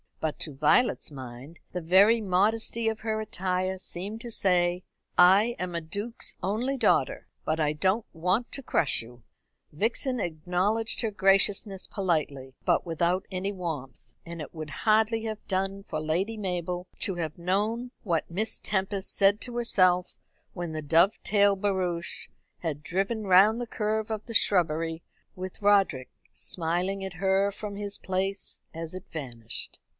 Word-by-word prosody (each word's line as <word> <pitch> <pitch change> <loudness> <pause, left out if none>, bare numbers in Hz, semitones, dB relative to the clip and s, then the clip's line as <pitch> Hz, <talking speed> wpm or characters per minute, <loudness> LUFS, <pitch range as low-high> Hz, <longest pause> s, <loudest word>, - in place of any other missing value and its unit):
But 155 -2 -2
to 150 - -2
Violet's 155 - +2
mind 130 +3 -9
the 180 - -2
very 200 +7 +5
modesty 220 +4 +1
of 220 -1 0
her 220 -1 -2
attire 185 -2 -1
seemed 195 +4 -4
to 240 - -7
say: 180 -3 +2 0.3
"I 200 +7 +6
am 180 -1 -4
a 170 - -1
duke's 205 +8 -4
only 235 +8 0
daughter, - - +2 0.2
but 155 +1 -1
I 150 -1 +2
don't 190 +8 +1
want 185 +8 0
to 275 - -3
crush 160 - +2
you." 120 0 -15 0.5
Vixen 235 - 0
acknowledged 180 +7 0
her 225 - 0
graciousness 195 0 +2
politely, 150 -8 -1
but - - +2
without 170 +2 0
any 190 +2 -2
warmth; 160 -9 -6
and 170 -1 -7
it 150 - -8
would 155 -1 -6
hardly 220 - +2
have 220 -1 -5
done 195 +1 -1
for 155 -5 -4
Lady 175 +8 -1
Mabel 180 -2 -3
to 195 -4 0
have 160 -3 -4
known 210 +8 -1
what 170 -6 0
Miss 210 +6 -1
Tempest 195 -1 -2
said 200 +1 +4
to 240 -1 -5
herself 185 -6 +3 0.4
when 175 -3 -4
the 155 -1 -4
Dovedale 200 +5 +3
barouche 185 -4 -2 0.3
had 150 -3 -4
driven 195 +7 -1
round 200 +5 +6
the 245 - -3
curve 215 0 -1
of 215 -1 -3
the 230 - -7
shrubbery, 165 -4 +2 0.3
with 185 +2 -7
Roderick 195 -11 +3 0.2
smiling 180 +3 -2
at 190 -1 -5
her 195 +3 +2
from 205 0 -6
his 200 0 -4
place 190 +1 -3
as 165 0 -6
it 185 +1 -8
vanished. 120 -7 -4
190 Hz, 150 wpm, -28 LUFS, 170-210 Hz, 0.5 s, I